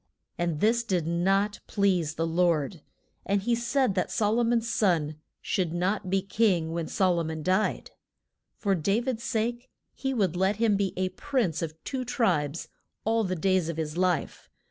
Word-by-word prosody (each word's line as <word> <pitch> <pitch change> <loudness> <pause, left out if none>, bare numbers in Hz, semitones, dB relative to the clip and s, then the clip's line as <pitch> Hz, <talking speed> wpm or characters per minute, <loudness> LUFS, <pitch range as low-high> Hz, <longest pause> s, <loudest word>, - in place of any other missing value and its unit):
And 170 -3 -2
this 235 +2 +3
did 180 -7 0
not 195 +5 +1
please 180 -6 +1
to 165 - -1
Lord, 165 -1 +1 0.4
and 200 0 +1
he 240 +3 +1
said 235 0 +1
that 185 -1 -1
Sol 215 +2 +1
o - - +3
mon's 230 0 +1
son 165 -9 +1 0.3
should 175 -4 -1
not 185 +3 -1
be 190 0 +1
king 190 -5 +1
when 165 -1 -2
Sol 185 -3 +2
o - - 0
mon 160 -1 -4
died. 185 +5 0 0.7
For 200 -2 +1
Da 195 +5 +1
vid's 245 -2 -3
sake 240 +2 -2 0.2
he 270 0 -3
would 195 -9 +1
let 190 +3 +2
him 220 -1 +2
be 195 -2 0
a 185 0 0
prince 225 - -1
of 160 -2 -4
two 260 -2 -3
tribes 175 - 0 0.4
all 225 +1 +2
the 185 -2 -1
days 185 -1 +1
of 165 - -4
his 155 -1 -3
life. 180 -1 -1
190 Hz, 180 wpm, -27 LUFS, 170-225 Hz, 0.7 s, this